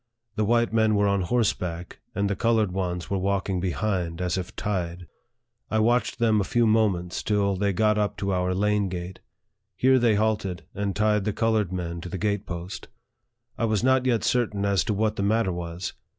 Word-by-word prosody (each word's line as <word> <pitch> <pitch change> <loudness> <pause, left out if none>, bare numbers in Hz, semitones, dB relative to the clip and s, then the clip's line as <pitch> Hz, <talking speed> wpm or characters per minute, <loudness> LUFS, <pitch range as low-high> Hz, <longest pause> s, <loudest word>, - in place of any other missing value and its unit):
The 110 - +1
white 120 +1 +2
men 110 -1 +3
were 100 0 +3
on 100 -1 +1
horseback, 90 -5 -1 0.2
and 100 +1 +1
the 100 - -1
colored 110 -2 +2
ones 90 -2 -3
were 100 - +1
walking 95 -1 0
behind, 90 -2 -2
as 90 -1 -1
if 95 -2 -5
tied. 90 -4 -3 0.6
I 110 - 0
watched 120 +3 +2
them 110 -3 +3
a - - +1
few 120 +4 +1
moments 105 -6 +1
till 100 -2 +1
they 100 +1 +1
got 105 +3 +2
up 105 -1 -1
to 100 -1 -1
our 90 0 0
lane 105 0 +1
gate. 90 +1 -6 0.6
Here 130 +5 +4
they 115 -3 +3
halted, 105 -4 -1
and 100 -1 -2
tied 105 -1 +2
the 105 0 -1
colored 110 -4 +1
men 85 -2 -4
to 90 - -7
the 95 - -4
gate 105 0 -1
post. 85 +1 -6 0.7
I 115 - +2
was 110 -1 0
not 130 0 +3
yet 120 -3 +2
certain 105 -5 0
as 100 -4 +2
to 110 - 0
what 110 +1 0
the - - -1
matter 105 0 +2
was. 85 +1 -5
100 Hz, 195 wpm, -25 LUFS, 90-110 Hz, 0.7 s, Here